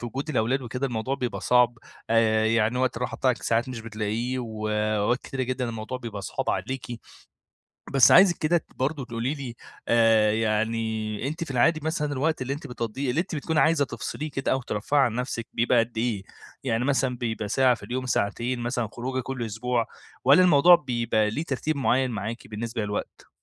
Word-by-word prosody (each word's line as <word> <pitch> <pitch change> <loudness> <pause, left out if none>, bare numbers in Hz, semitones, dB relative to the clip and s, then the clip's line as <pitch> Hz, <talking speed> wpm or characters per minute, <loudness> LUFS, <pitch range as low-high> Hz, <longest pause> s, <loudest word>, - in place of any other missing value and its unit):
في 120 - -5
وجود 135 +6 -4
الأولاد 130 +2 +1
وكده، 125 +3 -3
الموضوع 120 +2 -2
بيبقى 125 -3 -3
صعب، 120 -1 +3 0.3
آآ، 110 -1 +3
يعني 115 +2 +2
وقت 130 -2 0
الراحة 125 +1 -3
بتاعِك 130 -2 0
ساعات 115 +3 +1
مش 120 -3 -5
بتلاقيه 115 +3 -3
وأوقات 110 0 0
كتيرة 130 -1 -4
جدًا 125 -1 -2
الموضوع 115 +3 -5
بيبقى 110 -5 -6
صعب - - -2
عليكِ، 130 -1 -3 1.1
بس 130 -4 +7
عايزِك 185 -2 +7
كده 165 +2 +1
برضه 135 0 -2
تقولي 120 +4 -2
لي، 130 -5 -7 0.3
آآ، 115 -2 +4
يعني 110 +1 -1
أنتِ 160 +3 -3
في 140 - -6
العادي 145 +6 +3
مثلًا 150 -2 -1
الوقت 155 +1 0
اللي 130 +2 -1
أنتِ 145 0 -8
بتقضيه، 125 +2 -3
اللي 155 +7 +1
أنتِ 170 - -6
بتكوني 155 +2 0
عايزة 155 -3 +3
تفصليه 130 +5 -5
كده 135 - -1
أو 130 - +1
ترفهي 125 +5 0
عن 120 -4 +3
نفْسِك 125 -2 -3
بيبقى 120 +1 +3
قد 115 0 -2
إيه؟ 110 -4 -1 0.4
يعني 120 -1 0
مثلًا 135 -3 +1
بيبقى 110 -3 -3
ساعة 130 +3 +4
في - - -15
اليوم، 130 +1 -3
ساعتين 120 +2 -1
مثلًا، 120 -1 -2
خروجة 130 +2 -3
كل 125 -1 -4
أسبوع 115 +2 -1 0.4
والّا 140 +8 +7
الموضوع 175 +1 +7
بيبقى 120 -7 0
ليه 150 +9 -3
ترتيب 155 +2 -2
معيَّن 130 -1 +2
معاكِ 110 +2 -5
بالنسبة 115 +1 -4
للوقت؟ 105 0 -5
120 Hz, 180 wpm, -26 LUFS, 115-135 Hz, 1.1 s, بس